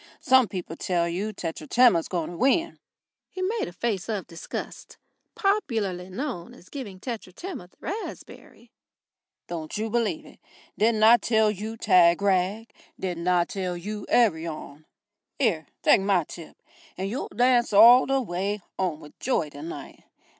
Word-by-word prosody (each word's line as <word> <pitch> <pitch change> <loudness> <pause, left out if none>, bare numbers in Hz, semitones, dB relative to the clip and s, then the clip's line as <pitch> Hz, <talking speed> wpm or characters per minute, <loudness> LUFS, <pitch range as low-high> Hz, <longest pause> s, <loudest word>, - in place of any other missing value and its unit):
Some 260 -2 +4
people 180 -4 -6
tell 170 -1 0
you 190 +6 -2
Tetratema's 170 - +2
going 175 -2 -3
to 175 - -8
win." 325 - +1 0.5
He 370 - -5
made 440 +5 -1
a - - -7
face 200 +1 -3
of 210 -4 -2
disgust, 165 -1 -8 0.4
popularly 220 - -1
known 215 - -5
as 180 - -18
giving 215 -10 -7
Tetratema 235 - -7
the - - -32
raspberry, 420 +6 -8 0.8
"Don't 160 0 -5
you 220 +1 -3
believe 240 +7 -1
it. - - -16 0.4
Didn't 220 0 +2
I 230 +2 +8
tell 220 -1 +2
you 215 +3 -6
Tagrag? 190 +3 +3 0.3
Didn't 175 -2 -3
I 180 -1 +3
tell 180 -2 -4
you 210 +3 -6
Arion? 160 -8 0 0.5
'Ere, 180 - +1 0.2
take - - +5
my 195 -3 +2
tip, 165 +1 -11 0.4
and 190 +1 -2
you'll 245 +8 -3
dance 245 +2 +3
all 235 +5 +8
the 270 -1 +1
w'y 195 +3 -2 0.2
'ome 175 -5 -1
with 150 - -15
joy 170 - 0
tonight. 145 0 -9
200 Hz, 145 wpm, -26 LUFS, 175-235 Hz, 0.8 s, I